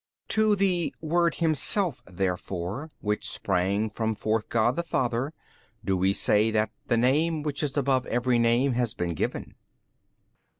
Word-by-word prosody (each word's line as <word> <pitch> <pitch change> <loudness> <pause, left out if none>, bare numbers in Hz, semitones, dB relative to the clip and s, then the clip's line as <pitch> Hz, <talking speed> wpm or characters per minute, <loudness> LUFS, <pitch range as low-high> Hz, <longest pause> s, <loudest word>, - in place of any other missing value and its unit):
B. - - -6
To 215 -1 +3
the 185 -4 0
Word 170 +1 +1
Himself 165 - +2
therefore 95 - -3
which 105 0 -2
sprang 100 +3 0
from 110 0 -2
forth 110 +1 -1
God 120 +2 +2
the - - 0
Father 130 -4 -1 0.5
do 95 - +1
we 95 +1 +2
say 105 +2 +2
that 110 0 0 0.2
the 120 - +2
Name 150 +6 +2
which 145 -2 -2
is 145 -2 -2
above 135 -2 +1
every 120 0 +1
name 120 +4 +3
has 120 -2 -1
been 85 -1 -2
given. 80 - -3
120 Hz, 155 wpm, -26 LUFS, 105-150 Hz, 0.5 s, To